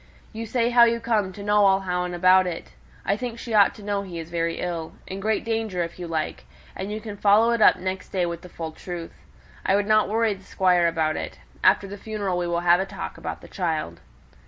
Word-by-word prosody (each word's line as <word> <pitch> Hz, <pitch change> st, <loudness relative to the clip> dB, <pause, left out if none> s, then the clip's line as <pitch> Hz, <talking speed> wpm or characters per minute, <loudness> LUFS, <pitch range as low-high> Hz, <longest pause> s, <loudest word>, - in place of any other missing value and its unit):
You 225 Hz, +1 st, -5 dB
say 235 Hz, +1 st, +1 dB
how 240 Hz, -1 st, +7 dB
you 235 Hz, 0 st, +1 dB
come 220 Hz, -4 st, 0 dB
to 200 Hz, +2 st, -9 dB
know 210 Hz, 0 st, +3 dB
all 195 Hz, -1 st, +3 dB
you 180 Hz, 0 st, -1 dB
do 175 Hz, -, -5 dB
about 185 Hz, +1 st, +5 dB
it; 170 Hz, -2 st, -6 dB, 0.3 s
I 200 Hz, -, +2 dB
think 235 Hz, +1 st, -5 dB
she 230 Hz, 0 st, -6 dB
ought 205 Hz, -2 st, +5 dB
to 210 Hz, -, -12 dB
know 200 Hz, -1 st, -1 dB
he 185 Hz, -4 st, -7 dB
is 165 Hz, 0 st, -7 dB
very 165 Hz, -1 st, -1 dB
ill 170 Hz, -2 st, -4 dB
in 190 Hz, -, -6 dB
great 215 Hz, +3 st, -1 dB
danger, 220 Hz, -6 st, -1 dB
if 170 Hz, +1 st, -8 dB
you 175 Hz, -, -5 dB
like: 160 Hz, -2 st, -3 dB, 0.3 s
and 195 Hz, +2 st, -5 dB
you 215 Hz, -, -3 dB
can 215 Hz, -2 st, -7 dB
follow 210 Hz, +3 st, +4 dB
it 235 Hz, -1 st, 0 dB
up -, -, +7 dB
next 185 Hz, 0 st, -5 dB
day 185 Hz, -2 st, 0 dB
with 170 Hz, -1 st, -4 dB
the 180 Hz, -, -12 dB
full 165 Hz, -2 st, -6 dB
truth. 170 Hz, +1 st, -7 dB, 0.5 s
I 195 Hz, -, +2 dB
wouldn't 215 Hz, +1 st, +3 dB
worry 225 Hz, 0 st, +2 dB
the 195 Hz, -1 st, -13 dB
Squire 180 Hz, -2 st, +2 dB
about 160 Hz, -2 st, 0 dB
it. -, -, -5 dB, 0.3 s
After -, -, +5 dB
the 200 Hz, +1 st, -8 dB
funeral 200 Hz, -5 st, -2 dB
we 175 Hz, -, -1 dB
will 170 Hz, 0 st, 0 dB
have 175 Hz, 0 st, +5 dB
a 190 Hz, -, 0 dB
talk -, -, -7 dB
about -, -, -5 dB
the -, -, -12 dB
child." 160 Hz, -, -3 dB
190 Hz, 240 wpm, -24 LUFS, 175-215 Hz, 0.5 s, how